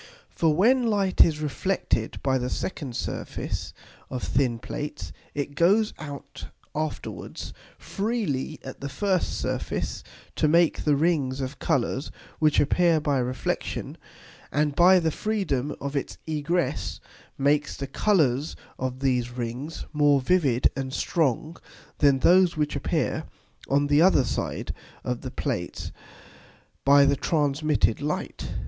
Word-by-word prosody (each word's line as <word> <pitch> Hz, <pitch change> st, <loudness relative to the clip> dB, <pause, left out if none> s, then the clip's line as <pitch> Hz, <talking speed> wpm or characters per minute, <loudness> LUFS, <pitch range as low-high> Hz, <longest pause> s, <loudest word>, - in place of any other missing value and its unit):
_ -, -, -17 dB, 0.3 s
For 165 Hz, -2 st, +2 dB
when 240 Hz, +7 st, +4 dB
Light 200 Hz, -4 st, +4 dB
is 155 Hz, -2 st, 0 dB
reflected 150 Hz, -, -1 dB
by 130 Hz, -1 st, +2 dB
the 125 Hz, 0 st, -2 dB
second 135 Hz, -4 st, -4 dB
Surface -, -, -4 dB, 0.4 s
of 130 Hz, -2 st, -4 dB
thin 125 Hz, -3 st, +1 dB
Plates, 150 Hz, +5 st, -6 dB, 0.2 s
it 145 Hz, 0 st, -3 dB
goes 200 Hz, +8 st, +3 dB
out 140 Hz, -2 st, -8 dB, 0.3 s
afterwards 155 Hz, -1 st, -5 dB, 0.2 s
freely 200 Hz, -, -2 dB
at 130 Hz, -, -8 dB
the 140 Hz, -, -4 dB
first 185 Hz, +6 st, 0 dB
Surface -, -, -3 dB, 0.3 s
to -, -, +3 dB
make 170 Hz, +1 st, +3 dB
the 150 Hz, -2 st, +4 dB
Rings 140 Hz, -4 st, +1 dB
of 135 Hz, +1 st, -4 dB
Colours 130 Hz, +2 st, 0 dB, 0.3 s
which 155 Hz, -1 st, +4 dB
appear 165 Hz, +3 st, +3 dB
by 145 Hz, -3 st, +1 dB
Reflexion; 125 Hz, +1 st, -3 dB, 0.6 s
and, 150 Hz, 0 st, +1 dB
by 185 Hz, +2 st, +7 dB
the 165 Hz, -2 st, +1 dB
freedom 155 Hz, -, -1 dB
of 140 Hz, +1 st, -4 dB
its 140 Hz, -, -3 dB
egress, 155 Hz, -1 st, -1 dB, 0.4 s
makes 145 Hz, +2 st, +1 dB
the 140 Hz, -, -3 dB
Colours 145 Hz, -3 st, +1 dB, 0.2 s
of 130 Hz, 0 st, -3 dB
these 125 Hz, -3 st, +1 dB
Rings 125 Hz, +6 st, -5 dB
more 145 Hz, -2 st, +4 dB
vivid 135 Hz, -4 st, +2 dB
and 135 Hz, -1 st, -3 dB
strong 155 Hz, +2 st, 0 dB, 0.4 s
than 140 Hz, -2 st, +5 dB
those 180 Hz, -1 st, +5 dB
which 150 Hz, -1 st, 0 dB
appear -, -, -1 dB, 0.4 s
on 140 Hz, +1 st, +3 dB
the 145 Hz, +1 st, +4 dB
other 175 Hz, -6 st, +5 dB
side 115 Hz, -, -3 dB, 0.3 s
of 125 Hz, -1 st, -3 dB
the 130 Hz, -, -5 dB
Plates 120 Hz, -, -3 dB, 0.9 s
by 140 Hz, 0 st, +6 dB
the 140 Hz, 0 st, +3 dB
transmitted 145 Hz, -5 st, +1 dB
Light. 150 Hz, +1 st, -3 dB
145 Hz, 135 wpm, -26 LUFS, 135-165 Hz, 0.9 s, by